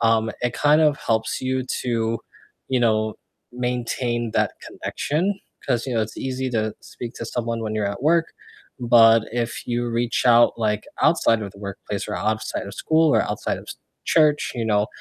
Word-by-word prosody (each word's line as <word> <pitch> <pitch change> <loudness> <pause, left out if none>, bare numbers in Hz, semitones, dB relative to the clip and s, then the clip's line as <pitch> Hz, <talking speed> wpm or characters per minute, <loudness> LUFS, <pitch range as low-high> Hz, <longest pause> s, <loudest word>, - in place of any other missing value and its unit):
um, 115 -1 +3
it 120 - 0
kind 150 +1 +4
of 150 -3 +4
helps 110 -1 -1
you 130 0 -1 0.2
to, 115 -2 0 0.5
you 130 -2 +1
know, 110 -2 +2 0.4
maintain 120 -1 -2
that - - +1
connection. 185 +7 -2 0.3
'Cause, 120 -2 0
you 130 - -2
know, 115 - +2
it's 110 0 -6
easy 130 0 -3
to 110 -2 -1
speak 120 -1 -8
to - - -6
someone 115 -1 -2
when 110 0 -3
you're 105 - 0
at 100 +4 -4
work, 165 +2 +2 0.5
but 115 -2 +6
if 120 -1 -3
you 120 0 -1
reach 115 0 0
out, 120 0 +6
like, 105 -2 0 0.2
outside 115 -1 +4
of 100 - -6
the - - -16
workplace 100 0 -5
or - - -2
outside 110 -1 -2
of 100 - -8
school 160 -1 +3
or - - +4
outside - - -2
of - - -13 0.4
church, 150 -2 +3
you 115 - -2
know, 105 -1 +2
120 Hz, 180 wpm, -23 LUFS, 110-130 Hz, 0.5 s, but